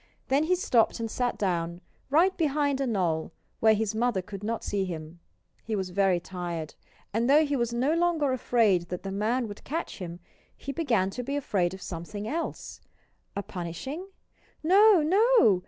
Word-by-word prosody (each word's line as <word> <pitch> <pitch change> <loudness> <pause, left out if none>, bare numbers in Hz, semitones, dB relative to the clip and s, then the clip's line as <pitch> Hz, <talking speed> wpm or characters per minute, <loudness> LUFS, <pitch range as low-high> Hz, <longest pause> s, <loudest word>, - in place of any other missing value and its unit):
Then 280 +3 +3
he 365 +3 +3
stopped 240 -10 +2
and 225 -1 -3
sat 245 -1 -1
down, 170 -3 -1 0.3
right 345 +7 +4
behind 285 -3 +1
a 270 - 0
knoll, 175 -8 -1 0.3
where 220 -1 +5
his 215 0 -1
mother 220 -4 0
could 200 +1 -8
not 225 +2 -2
see 200 -1 -1
him. 165 -2 -6 0.4
He 220 - -2
was 190 -2 -3
very 190 -1 +2
tired. 175 -3 -5 0.4
And 230 +4 +1
though 300 +3 +6
he 290 -1 -1
was 235 -3 0
no 255 +6 +1
longer 335 -4 +2
afraid 215 -8 +2
that 180 - -5
the 195 - -4
man 225 +5 0
would 205 -1 -9
catch 325 -2 -4
him, 175 -2 -6 0.4
he 280 - -5
began 235 - +1
to 250 - -4
be 275 +3 -3
afraid 190 -10 0
of 190 - -11
something 190 +5 -6
else.... 330 +6 -4 0.5
A 200 - -2
punishing? 195 - -6 0.6
No 390 +1 +6
no! 390 - +5
225 Hz, 175 wpm, -28 LUFS, 185-285 Hz, 0.6 s, though